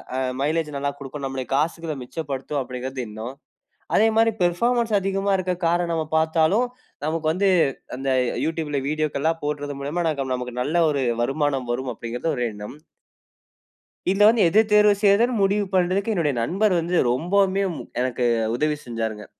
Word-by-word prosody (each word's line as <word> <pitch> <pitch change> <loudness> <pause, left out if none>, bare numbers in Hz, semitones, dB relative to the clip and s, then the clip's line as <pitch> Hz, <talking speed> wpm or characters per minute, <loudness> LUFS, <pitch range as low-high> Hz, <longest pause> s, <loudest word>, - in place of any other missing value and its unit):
அ - - -1 0.2
mileage 155 +2 0
நல்லா 140 0 -1
குடுக்கும், 140 0 -8
நம்மளோட 135 -1 -4
காசுகள 165 +1 -1
மிச்சப்படுத்தும் 140 +1 -4
அப்டிங்கிறது 130 +1 -5
எண்ணம். 110 +5 -7 0.6
அதேமாரி 225 +1 +4
பெர்ஃபார்மன்ஸ் 230 +6 +1
அதிகமா 195 +1 -1
இருக்க 185 0 -1
கார 175 +1 +2
நம்ம 160 -1 0
பாத்தாலும் 160 +9 +2 0.4
நமக்கு 160 0 -1
வந்து, 195 +3 +2 0.5
அந்த 135 +1 -5 0.3
அ - - -4
YouTubeல 155 -3 -2
வீடியோக்கள்லாம் 155 +1 -1
போடறது 145 -1 -3
மூலியமா 150 +5 -2
நாக 140 -3 -2
நமக்கு 125 -1 -6
நல்ல 155 +6 0
ஒரு 140 -2 0 0.2
வருமானம் 135 -1 -1
வரும் 125 +1 -2
அப்படிங்கிறது 120 +7 -4
ஒரு 125 - -1
எண்ணம். 105 +6 -9 1.3
இது 195 - 0
வந்து 225 -1 +4
எத 210 +7 +5
தேர்வு 210 0 +6
செய்றதுனு 215 +5 +4
முடிவு 205 +1 +2
பண்றதுக்கு 185 +4 +1
என்னுடைய 160 -7 +1
நண்பர் 195 - +1
வந்து 170 +2 -2 0.2
ரொம்பவுமே 190 +7 +2 0.4
எனக்கு 125 -1 -1 0.2
அ - - -1
உதவி 150 +2 +1
செஞ்சாருங்க. 110 -3 -4
155 Hz, 150 wpm, -23 LUFS, 135-190 Hz, 1.3 s, தேர்வு